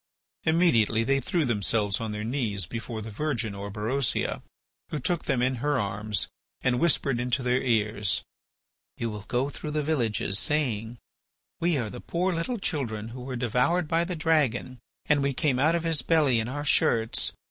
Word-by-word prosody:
Immediately 125 -10 +3
they 135 +3 +2
threw 160 +4 0
themselves 105 -3 +1
on 110 -1 -2
their 105 0 -4
knees 110 -6 -2
before 115 +2 -5
the 110 - -7
virgin 115 -3 -2
Orberosia, 105 +6 -1 0.5
who - - -2
took 165 +5 -1
them 130 -4 +1
in 130 0 +1
her 145 +2 +1
arms 105 0 -1 0.3
and 125 -1 +2
whispered 140 -6 +2
into 125 +2 0
their 125 +1 +2
ears: 105 -5 +1 0.7
"You 115 -1 -2
will 105 -1 -7
go 125 +2 +1
through 150 - -6
the 150 0 -1
villages 115 -9 0
saying: 120 -7 -1 0.6
'We 170 -2 +2
are 115 -5 -2
the 125 - -8
poor 180 +2 0
little 170 +9 -1
children 115 - -2
who 125 +2 -8
were 130 +1 -5
devoured 125 +8 +1
by 165 +2 +2
the 180 +1 -3
dragon, 145 -6 +1 0.3
and 150 -1 +3
we 140 0 +1
came 130 -1 +1
out 155 +5 +4
of 170 - -1
his 165 -2 +2
belly 150 -8 +3
in 110 +2 -2
our 145 +3 -4
shirts. 115 -5 +2
125 Hz, 175 wpm, -27 LUFS, 110-150 Hz, 0.7 s, out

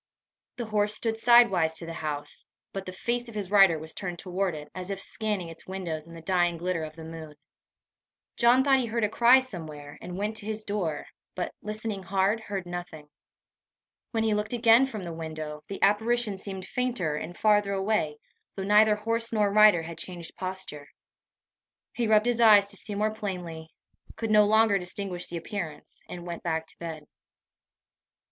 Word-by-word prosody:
The 240 - -4
horse 210 -1 +2
stood 225 0 -1
sidewise 225 -9 +5
to 165 - -5
the 165 - -6
house, 145 -2 -4 0.3
but 195 -1 -5
the - - -4
face 240 +5 -2
of 225 - -11
his 200 -3 -4
rider 195 -5 +6
was 160 +1 -6
turned 180 -3 -5
toward 185 -1 -2
it, 150 0 -8
as 185 0 -6
if 195 -1 -3
scanning 210 -4 -2
its 165 - -10
windows 170 -5 -4
in 170 - -11
the 165 - -11
dying 175 -1 +1
glitter 175 -1 -2
of 155 0 -7
the 165 - -10
moon. 160 -2 -9 1.0
John 245 +2 +5
thought 270 -1 +4
he 245 - -1
heard 230 0 -1
a 210 - +2
cry 240 +4 +6
somewhere, 155 - -8
and 180 +1 -7
went 210 +2 -2
to 215 -1 -3
his 215 0 -3
door, 185 -8 -2 0.3
but, 180 - -3
listening 215 -1 -4
hard, 195 +4 +1
heard 200 -4 -5
nothing. 175 -4 -7 1.0
When 225 -2 -1
he 220 -1 +2
looked 210 +2 -2
again 235 +2 +5
from 215 -7 -6
the 170 -1 -5
window, 155 -2 -6
the 200 - -6
apparition 220 +1 +2
seemed 190 -1 -5
fainter, 235 -11 -1
and 170 +3 -6
farther 205 -2 +3
away, 195 -6 0 0.4
though 195 - -4
neither 210 +2 +5
horse 230 +2 -1
nor 210 -3 +2
rider 210 -5 +6
had 165 0 -7
changed 175 -3 -6
posture. 185 -6 -5 1.1
He 235 -2 -1
rubbed 215 0 +4
his 240 -1 +1
eyes 205 -3 +7
to 200 - -4
see 205 +1 -4
more 215 +1 0
plainly, 180 -7 -6 0.5
could 225 -1 -3
no 210 -1 +6
longer 220 -1 +4
distinguish 180 0 -3
the 170 - -5
appearance, 165 -3 -6
and 175 -1 -7
went 170 -1 -6
back 160 -1 -2
to - - -13
bed. 160 -3 -6
195 Hz, 185 wpm, -27 LUFS, 170-215 Hz, 1.1 s, eyes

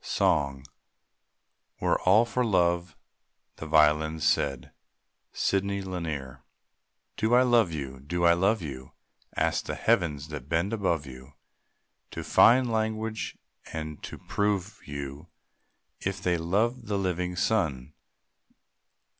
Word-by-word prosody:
SONG. 70 -2 0 1.1
"We - - -2
're - - +3
all 105 +5 +5
for 120 +2 -1
love," 85 -5 +1 0.6
the 80 - -7
violins 80 +1 +3
said. 70 -4 0 0.6
SIDNEY 100 0 0
LANIER. 80 -8 -5 0.7
Do 110 +2 +2
I 125 - +6
love 120 -7 +3
you? 70 -4 -5
Do 85 +6 -2
I 85 - +7
love 95 +3 +1
you? 65 -4 -8 0.4
Ask - - +1
the - - -3
heavens 80 -10 0
that 75 -3 -7
bend 85 +6 0
above 85 -8 0
you 65 +1 -12 0.8
To - - -6
find 125 +1 +5
language 110 0 -2 0.4
and 80 -2 -5
to - - -7
prove 100 -1 -2
you 70 +2 -6 0.7
If 95 0 -3
they 90 -1 +1
love 105 +9 0
the 105 -1 0
living 90 -2 -2
sun. 80 - 0
85 Hz, 120 wpm, -27 LUFS, 75-105 Hz, 1.1 s, I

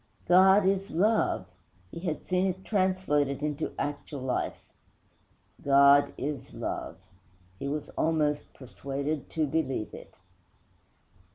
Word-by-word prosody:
'God 190 +3 +6
is 195 +1 +1
love!' 210 - +1 0.5
he - - -7
had 170 -3 -4
seen 185 +1 +1
it 190 0 -4
translated 185 - 0
into 150 +1 -2
actual 145 -1 -4
life. 130 -1 -3 1.0
'God 140 0 +5
is 140 -1 -5
love!' - - -4 0.6
he - - -4
was 150 +1 -3
almost 150 -2 0
persuaded 140 +3 -4
to 160 -1 0
believe 135 -7 -2
it. - - -12
150 Hz, 110 wpm, -28 LUFS, 140-185 Hz, 1.0 s, God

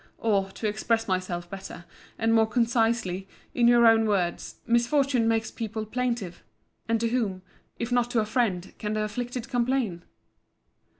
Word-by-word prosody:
—Or, 200 -4 +1
to 220 - -3
express 225 +2 0
myself 185 -2 -2
better, 185 -2 -9 0.3
and 225 0 +2
more 220 -1 +4
concisely, 225 -5 +1 0.3
in 240 -1 +3
your 240 0 +6
own 225 -1 +5
words, 180 -5 -1
misfortune 240 +1 +2
makes 225 -1 0
people 220 -1 -4
plaintive: 235 -6 -3 0.5
And 230 0 +2
to 230 - +1
whom, 210 -7 -1 0.3
if 235 +1 -4
not 245 -1 +2
to 240 - +1
a 215 - +1
friend, 210 -6 -1
can 210 0 -2
the 215 0 0
afflicted 245 +3 -4
complain? 245 -7 0
225 Hz, 155 wpm, -27 LUFS, 200-240 Hz, 0.5 s, your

